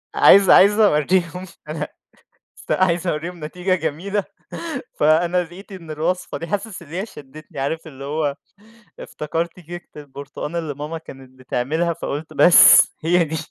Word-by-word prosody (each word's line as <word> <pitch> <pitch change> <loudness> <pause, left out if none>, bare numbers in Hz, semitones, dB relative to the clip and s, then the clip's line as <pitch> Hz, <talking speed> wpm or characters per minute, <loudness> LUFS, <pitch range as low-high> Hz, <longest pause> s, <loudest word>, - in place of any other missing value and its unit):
عايز 195 -2 +6
عايز 205 +3 +6
أوريهم 175 -2 +2
إن 185 - -9 0.2
أنا 150 -1 -4 0.7
أس - - -15
عايز 180 -1 +1
أوريهم 170 0 -4
نتيجة 180 +4 -1
جميلة، 185 +5 -2 0.8
فأنا 170 +4 +3
لقيت 185 +5 -13
إن 170 -4 -10
الوصفة 160 +4 -3
دي، 165 - -6
حاسس 200 +1 -4
إن 165 - -15
هي 180 +7 -4
شدّتني، 150 -2 -13
عارف 160 +5 -3
اللي 135 -3 -10
هو 145 0 -2 0.6
افتكرت 165 +3 -5
كيكة 175 0 -10
البرتقان 140 +3 -8
اللي 160 -3 -3
ماما 150 +3 -5
كانت 130 -4 -14
بتعملها، 150 +7 -1
فقلت 155 -2 -6
بس 175 - +7
هي 175 +2 +3
دي، 160 0 -4
165 Hz, 145 wpm, -20 LUFS, 150-180 Hz, 0.8 s, بس